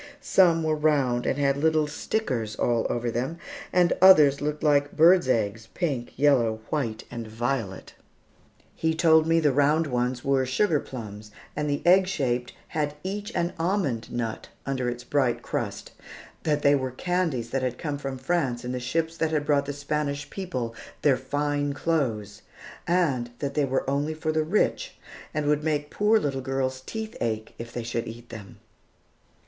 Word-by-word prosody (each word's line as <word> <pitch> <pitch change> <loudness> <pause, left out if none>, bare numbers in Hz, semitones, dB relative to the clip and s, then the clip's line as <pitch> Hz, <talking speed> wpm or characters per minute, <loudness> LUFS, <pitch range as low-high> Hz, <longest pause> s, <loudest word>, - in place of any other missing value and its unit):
Some 170 -4 +4
were 155 0 +1
round 140 -6 +1
and 135 - +1
had 140 -1 +2
little 155 +1 +2
"stickers" 135 - -2
all 120 -2 +1
over 120 0 -1
them, 130 +8 -2 0.3
and 175 -1 +4
others 150 -7 +7
looked 150 +1 -2
like 145 -1 +2
birds' 170 -1 +6
eggs, 110 -1 0
pink, 140 -9 -2
yellow, 120 -6 +3
white, 120 -8 -2
and 115 -2 -6
violet. 115 -3 -3 0.8
He 160 0 0
told 160 -1 +5
me 165 0 +4
the 150 -3 +3
round 145 +4 +3
ones 125 -2 -1
were 135 -1 +3
sugar 150 +4 +2
plums, 105 -6 -8 0.3
and 150 0 -1
the 145 - -1
egg 185 +2 +6
shaped 125 -9 -1 0.2
had 150 -1 -2
each 205 +3 -4
an 170 +1 0
almond 165 - -1
nut 115 -2 -3 0.2
under 130 -2 -1
its 120 0 -5
bright 130 -2 0
crust; - - -4 0.5
that 150 -1 0
they 145 - +6
were 130 -2 0
candies 150 -4 -1
that 135 - 0
had 125 -1 -2
come 145 -3 -4
from 135 -2 -4
France 130 -4 -1
in 125 - -3
the 125 - -2
ships 160 +7 -1
that 160 - +1
had 150 -2 -1
brought 145 -1 +2
the - - -1
Spanish 145 0 -3
people 130 -12 -4 0.3
their 145 -3 +5
fine 145 +2 -1
clothes; 130 -10 -1 0.5
and 150 -9 +1
that 140 +1 -3
they 150 -1 +2
were 135 0 -1
only 145 +3 0
for 155 0 -2
the 155 0 +1
rich, 210 - 0 0.4
and 150 -1 -2
would 150 0 +1
make 150 -2 -1
poor 210 +2 +3
little 140 -9 -1
girls' 130 0 -2
teeth 220 0 -5
ache, 110 -2 -2
if 115 0 -7
they 120 - -4
should 115 0 -3
eat 115 +1 -9
them. 105 -4 -10
140 Hz, 175 wpm, -26 LUFS, 125-155 Hz, 0.8 s, others